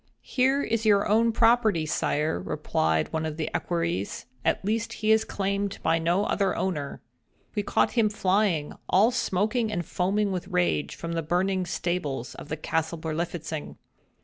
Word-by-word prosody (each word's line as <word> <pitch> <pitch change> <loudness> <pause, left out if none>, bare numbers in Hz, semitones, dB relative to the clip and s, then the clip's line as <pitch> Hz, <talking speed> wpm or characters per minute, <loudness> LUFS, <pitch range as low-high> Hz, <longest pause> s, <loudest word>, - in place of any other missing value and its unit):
"He 255 - +1
is 265 -5 +1
your 205 -2 +4
own 230 +2 +4
property, 225 -7 +3
sire," 150 - 0
replied 80 -3 0
one 160 0 0
of 155 -1 -3
the 155 - -2
equerries, 165 - -2 0.2
"at - - 0
least 225 +2 -1
he 215 0 +1
is 220 0 +5
claimed 200 0 -2
by 165 +1 +3
no 175 +5 +1
other 195 -3 +1
owner. 150 -7 -3 0.5
We 210 - 0
caught 205 - +1
him 225 -3 +3
flying, 190 -6 +1 0.2
all 210 +6 +5
smoking 220 0 0
and 175 -4 -2
foaming 200 +5 0
with 180 -2 -3
rage, 80 -5 0
from 170 - -5
the 165 0 -1
burning 180 +3 0
stables 150 -10 -2
of - - -10
the 155 - -2
Castle 160 +2 -1
Berlifitzing. 160 -1 -4
180 Hz, 160 wpm, -27 LUFS, 160-210 Hz, 0.5 s, is